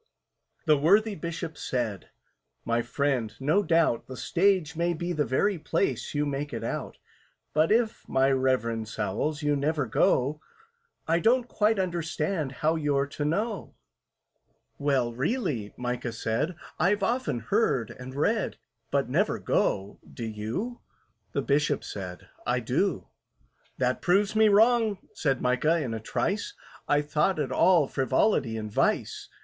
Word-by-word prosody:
The 155 -3 +4
worthy 205 +8 +4
Bishop 165 -2 -5
said, 115 -7 -3 0.6
"My 115 0 +1
friend, 125 -3 -1
no 150 +9 +2
doubt 165 - +2
The 130 - -8
Stage 180 -3 +1
may 170 +1 0
be 175 +2 -3
the 155 - +1
place 135 -2 -1
you 145 0 +1
make 145 +1 -3
it - - -4
out; - - -4 0.6
But 155 +4 +3
if, 225 0 +1
my 135 +1 +3
REVEREND 115 -4 +1
SOWLS, 145 +7 -2
you 145 0 +2
never 145 0 0
go, 130 +5 +2 0.7
I 165 +1 +3
don't 240 +4 +3
quite 215 -1 +2
understand 170 -4 -1
how 160 +1 +3
you're 145 -3 +1
to 140 +1 -5
know." 200 +7 -2 1.0
"Well, 135 -4 +1
really," 130 - -1
MICAH 125 -1 -3
said, 115 +10 -1 0.2
"I've 195 +2 +2
often 190 - 0
heard 115 0 +1
and 130 +1 -9
read, 210 +9 0 0.3
But - - +1
never - - +1
go—do 100 +4 -2
you?" 110 - -4 0.5
The - - 0
Bishop 145 0 +1
said, 90 -3 -7 0.2
"I - - +1
do." - - -1 0.7
"That 125 0 0
proves 200 +4 +2
me 220 0 +6
wrong," 220 0 +4 0.2
said 135 -4 0
MICAH, 150 +6 +2
in 120 -4 -3
a 110 - -3
trice: 215 - -2 0.3
"I 145 0 +3
thought 150 +5 +1
it 145 -3 -2
all 175 -6 +4
frivolity 130 - +1
and 105 -1 -5
vice." - - 0
150 Hz, 140 wpm, -27 LUFS, 125-185 Hz, 1.0 s, me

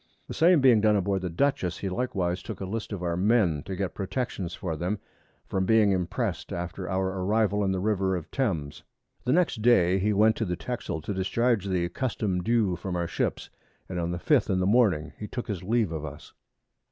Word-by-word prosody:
The - - -6
same 170 -2 +5
being 125 -5 +6
done 105 0 +4
aboard 95 -1 0
the 90 - -3
Dutchess, 90 -1 0
he 100 - -4
likewise 95 -4 -1
took - - -7
a 95 - -4
List 110 +4 -4
of 95 -4 -4
our 85 -1 0
Men 95 -5 +2
to 95 - -3
get 95 0 -3
Protections 95 -3 -3
for 85 -5 -4
them, 90 +7 -2 0.5
from 95 -1 -1
being 110 -2 +5
impress'd 90 -3 -2
after 90 +2 -4
our 95 0 0
Arrival 105 0 +2
in 95 - +1
the 95 - -1
River 95 -2 +1
of 85 -3 -6
Thames. 85 - -2 0.4
The 125 - +1
next 160 -8 +2
Day 95 -6 +4
he 105 +3 +1
went 110 +2 +4
to 110 - -1
the 90 -2 -2
Texel 95 -5 -4
to 100 - -4
discharge 110 +3 +1
the 90 -2 0
Custom 105 -8 -1
due 110 -3 +2
from 90 0 -5
our 85 -1 0
Ships, 85 - -2 0.4
and 90 -1 -4
on 85 0 -1
the 85 - -2
5th 125 - +2
in 95 -1 +2
the 95 - +1
Morning 95 -8 +2
he 105 - -5
took 120 +1 -5
his 100 -5 -3
Leave 110 -1 +1
of 80 -2 -4
us. 75 -1 -9
95 Hz, 215 wpm, -27 LUFS, 90-110 Hz, 0.5 s, being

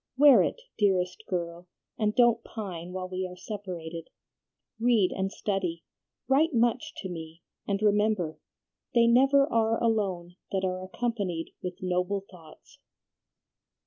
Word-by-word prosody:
Wear 285 -1 +8
it, - - -1 0.2
dearest 185 -1 +1
girl, 175 -1 -4 0.3
and 210 -1 0
don't 235 -2 +4
pine 180 -6 -6
while 185 0 -4
we 185 0 -3
are 180 - -10
separated. 180 -5 -6 0.7
Read 225 -5 +3
and 190 0 -2
study, 185 -6 -2 0.4
write 285 +3 +3
much 235 +1 +1
to - - -5
me, 165 -1 -8 0.2
and 200 -1 0
remember, 210 -5 +2 0.6
"They 235 -1 +6
never 270 +4 +5
are 225 -4 +1
alone 190 -6 -1
that 190 -1 0
are 185 0 -2
accompanied 190 -5 -3
with 180 0 -6
noble 185 +2 -1
thoughts."'" 165 -4 -16
195 Hz, 130 wpm, -28 LUFS, 180-225 Hz, 0.7 s, Wear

